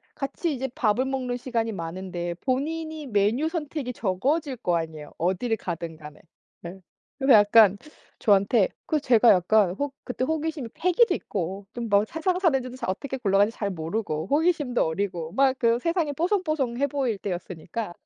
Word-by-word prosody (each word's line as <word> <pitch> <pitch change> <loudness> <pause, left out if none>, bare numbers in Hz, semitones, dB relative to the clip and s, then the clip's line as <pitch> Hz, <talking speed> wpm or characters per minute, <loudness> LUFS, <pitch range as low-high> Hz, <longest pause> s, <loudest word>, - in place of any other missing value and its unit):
같이 285 +4 -2
이제 265 0 -3
밥을 230 +2 +2
먹는 260 -2 -2
시간이 230 -3 -2
많은데 175 0 -4
본인이 310 +3 -2
메뉴 225 +8 +1
선택이 300 -6 -4
적어질 260 - -1
거 175 -7 0
아니에요, 160 -2 -6
어디를 190 +7 0
가든 170 -3 -5
간에. 150 -1 -12 0.4
예. 185 +3 -8 0.4
그래서 270 -1 +5
약간 205 -1 +6 0.4
저한테 200 0 +3 0.2
그 310 - +1
제가 240 -3 +5
약간 190 +1 +3
호 285 +6 -3
그때 250 0 -3
호기심이 315 -4 -2
패기도 365 +7 +3
있고 195 +1 -4
좀 235 -2 -4
뭐 200 +1 +4
세상 345 - -1
사는지도 270 -9 +1
잘 - - -4
어떻게 265 +8 -3
굴러가는지 205 -1 +2
잘 205 - -1
모르고 160 -1 -3
호기심도 295 -5 +2
어리고 170 -1 -3
막 270 -1 +3
그 235 0 +3
세상이 335 -1 0
뽀송뽀송해 310 - 0
보일 260 -6 -1
때였으니까. 180 +2 -5
235 Hz, 360 characters per minute, -25 LUFS, 190-285 Hz, 0.4 s, 약간